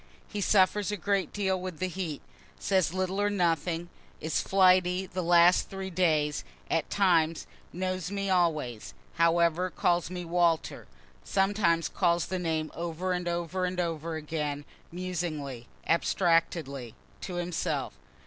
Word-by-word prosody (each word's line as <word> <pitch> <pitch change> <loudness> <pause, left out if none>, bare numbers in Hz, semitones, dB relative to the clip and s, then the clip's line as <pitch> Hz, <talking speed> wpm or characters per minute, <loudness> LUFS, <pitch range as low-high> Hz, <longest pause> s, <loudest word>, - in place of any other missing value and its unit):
He 210 - -4
suffers 200 +1 +3
a 210 - -2
great 200 -2 0
deal 190 -2 -1
with 185 -3 -5
the 185 - -1
heat 175 -5 -5 0.3
says 190 -5 +1
little 185 +2 -1
or 205 - +2
nothing 175 -3 0 0.3
is 160 - -1
flighty 185 -1 +4
the 185 0 -4
last 175 +1 +5
three 190 -1 -5
days, 155 -4 +1 0.3
at 165 - 0
times 165 -5 +2 0.3
knows 185 0 -3
me 200 0 -2
always, 160 - 0 0.2
however 170 +1 +3
calls 175 0 +1
me 180 -1 -5
"Walter" 170 -1 0 0.4
(sometimes 195 -4 +2
calls 175 -2 +1
the 185 - -3
name 160 -2 -1
over 170 +2 -3
and 180 -1 -3
over 175 +2 -2
and 180 0 -3
over 165 -1 -2
again, 150 -2 -3 0.3
musingly, 160 -8 -4 0.2
abstractedly, 165 - +1 0.3
to 180 - -5
himself.) 175 -1 -2
175 Hz, 135 wpm, -29 LUFS, 165-185 Hz, 0.4 s, last